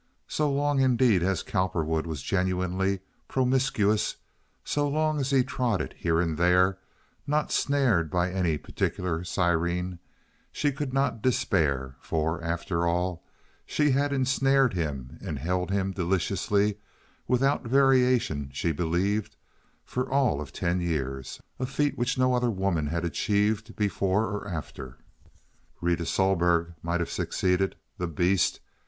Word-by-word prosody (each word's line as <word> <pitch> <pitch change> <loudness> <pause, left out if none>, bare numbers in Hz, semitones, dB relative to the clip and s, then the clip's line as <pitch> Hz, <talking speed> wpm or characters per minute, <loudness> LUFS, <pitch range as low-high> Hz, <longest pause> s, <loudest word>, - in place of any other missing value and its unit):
So 150 -1 0
long, 145 0 +1
indeed, 125 -6 +4
as 95 0 0
Cowperwood 85 -4 -1
was 75 -4 -5
genuinely 95 +1 0 0.3
promiscuous, 125 -5 +1 0.5
so 145 0 0
long 155 +1 +1
as 135 -1 -1
he 135 -2 +4
trotted 120 -6 -1
here 80 -1 0
and 85 -2 -1
there, 90 +2 +4 0.5
not 150 +1 0
snared 125 - +2
by 90 +3 0
any 90 -5 0
particular 85 +3 -2
siren, 85 0 0 0.5
she 145 - 0
could 135 0 -4
not 135 -4 0
despair, 70 - +1
for, 80 +2 -2
after 85 0 -1
all, 90 0 -1 0.4
she 150 -1 +2
had 140 +2 +1
ensnared 135 -1 +2
him 70 -7 -4
and 75 - -4
held 90 +6 -1
him 95 -1 0
deliciously—without 100 +8 -1
variation, 125 - +3
she 75 +5 -1
believed, 95 +7 -1 0.5
for 130 +1 -3
all 130 - +2
of 75 - -8
ten 85 +1 -1
years—a 70 - -4
feat 145 +2 0
which 125 +2 -1
no 130 0 +3
other 125 -1 +2
woman 95 -7 0
had 85 +3 -2
achieved 105 +5 0
before 100 +1 +1
or 100 -1 -4
after. 75 -7 -6 0.8
Rita 85 0 0
Sohlberg 85 -3 +2
might 85 +1 -1
have 85 - -3
succeeded—the 90 -1 -1
beast! 85 +3 +1
95 Hz, 125 wpm, -27 LUFS, 85-125 Hz, 0.8 s, indeed